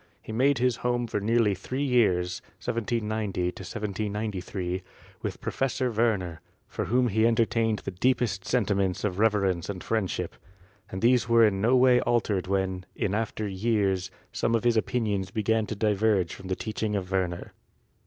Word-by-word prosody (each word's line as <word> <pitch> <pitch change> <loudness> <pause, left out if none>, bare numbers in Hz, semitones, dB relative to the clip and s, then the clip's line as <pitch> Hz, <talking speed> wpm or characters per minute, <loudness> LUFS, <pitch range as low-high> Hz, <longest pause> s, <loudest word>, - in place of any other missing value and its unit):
He - - -9
made 135 +5 +3
his 125 -2 +1
home 120 0 0
for 110 - -2
nearly 110 0 +2
three 130 +9 -3
years 95 -9 +2
(1790 110 -5 -2
1793) 100 -2 -4 0.4
with - - -4
Professor 130 -1 -1
Werner, 100 -8 0 0.3
for - - -3
whom 125 +1 +2
he 110 +2 +3
entertained 115 -1 +1
the - - -2
deepest 105 0 0
sentiments 100 -6 0
of 100 -2 -1
rever 105 -2 +3
ence 90 -2 -1
and 95 -3 -5
friendship, 110 -5 -2 0.5
and 95 +2 -6
these 120 -1 +4
were 115 -1 +6
in 95 -2 +1
no 120 +5 +4
way 125 -1 +5
altered 110 -6 0
when, 95 -1 -1
in 95 - -1
after 110 0 -2
years, 95 -2 0 0.2
some 115 - 0
of 115 - 0
his 120 -1 +3
opinions 105 -4 0
began 110 +2 0
to 110 - -4
diverge 105 -3 +1
from 95 - -9
the 95 - -1
teaching 110 0 -3
of 95 -2 -3
Werner. 90 -2 -2
105 Hz, 160 wpm, -27 LUFS, 95-115 Hz, 0.5 s, were